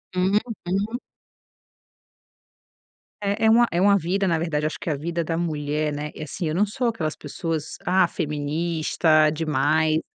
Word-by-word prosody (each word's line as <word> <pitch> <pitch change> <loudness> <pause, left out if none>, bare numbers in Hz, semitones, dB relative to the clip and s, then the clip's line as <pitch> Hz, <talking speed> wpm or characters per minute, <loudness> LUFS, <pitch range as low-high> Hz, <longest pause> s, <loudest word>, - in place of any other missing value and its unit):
Uhum. 200 +2 0 2.3
É, 200 +2 0
é - - +6
uma 235 +1 +5
é 170 - 0
uma 200 +2 +5
vida, 190 +3 0
na 165 -2 +1
verdade, 155 -2 -1
acho 155 - -3
que 200 - -4
a 150 - +1
vida 170 +3 -2
da 165 0 -2
mulher, 150 -2 -1
né, 150 +1 -4
e - - -6
assim 160 +4 -4
eu 155 - -2
não 200 +4 +3
sou 240 +5 -2
aquelas 160 -10 -2
pessoas, 160 +1 -4
ah, 185 0 +4
feminista 155 0 +1
demais, 155 0 +1
q - - -11
165 Hz, 160 wpm, -24 LUFS, 155-190 Hz, 2.3 s, é